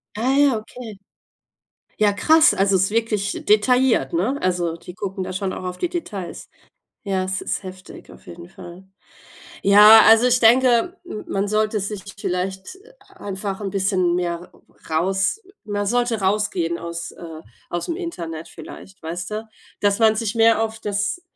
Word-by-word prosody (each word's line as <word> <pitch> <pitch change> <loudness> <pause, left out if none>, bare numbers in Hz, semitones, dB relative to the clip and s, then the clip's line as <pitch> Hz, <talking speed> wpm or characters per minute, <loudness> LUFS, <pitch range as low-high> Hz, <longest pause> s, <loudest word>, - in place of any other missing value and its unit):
Ah 250 +5 0
ja, 280 -5 +4
okay. 220 0 -10 1.0
Ja, 210 -1 +4
krass, 315 +10 +5
also 195 0 +2
ist 190 +1 +2
wirklich 215 -2 -2
detailliert, 225 - +3
ne? 210 +12 0
Also 175 -2 -1
die 180 +1 -12
gucken 190 -1 -5
da 185 - -6
schon 185 0 -3
auch - - -7
auf 180 0 -5
die 355 - -2
Details. 215 - -6 0.6
Ja, 190 -2 -1
es 190 +1 -3
ist - - -3
heftig, 185 0 -11
auf - - -17
jeden 170 0 -11
Fall. 180 0 -12 0.8
Ja, 210 +2 +8
also 225 +2 +6
ich 250 0 +3
denke, 245 +8 +4
m 215 -11 -8
man 195 +1 -1
sollte 215 +1 0
sich 200 0 -5 0.2
vielleicht 190 - -4 0.3
einfach 195 0 -6
'n 200 - -3
bisschen 185 -2 0
mehr 175 0 -3 0.4
raus 190 - 0 0.2
man 205 -1 -3
sollte 240 +1 0
rausgehen 190 -4 0
aus, 170 0 -6
äh 165 -2 -10 0.3
ausm 175 - -3
Internet 170 - -6
vielleicht, 190 0 -12
weißt 175 +5 -5
du, 215 +1 -5 0.3
dass 205 +1 +1
man 220 -1 +4
sich 220 -1 -2
mehr 225 0 +4
auf 220 0 -5
das 205 - -2
200 Hz, 155 wpm, -21 LUFS, 185-225 Hz, 1.0 s, Ja